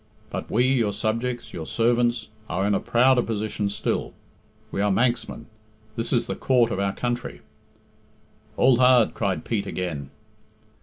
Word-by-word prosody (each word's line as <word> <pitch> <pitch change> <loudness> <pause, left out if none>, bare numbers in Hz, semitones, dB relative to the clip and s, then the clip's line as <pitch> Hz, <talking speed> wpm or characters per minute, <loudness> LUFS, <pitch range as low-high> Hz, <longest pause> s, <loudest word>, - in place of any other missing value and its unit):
But - - -5
we, 120 +3 +2
your 120 -6 +2
subjects, 115 +4 -2
your 80 -2 -6
servants, 120 0 +1 0.2
are 95 +2 0
in 105 - +2
a - - +2
prouder 125 +1 +3
position 105 -2 -2
still. 100 - -2 0.6
We 100 - -2
are 105 0 +2
Manxmen. 115 +1 0 0.5
This 115 - -3
is 120 - +2
the - - -3
Court 120 -3 +2
of 95 - -2
our 100 0 0
country." 120 -11 -3 1.2
"Hould 130 -1 +4
hard," 125 -3 +5
cried 100 -4 -2
Pete 100 -4 -2
again. 80 -7 -4
115 Hz, 150 wpm, -24 LUFS, 100-120 Hz, 1.2 s, hard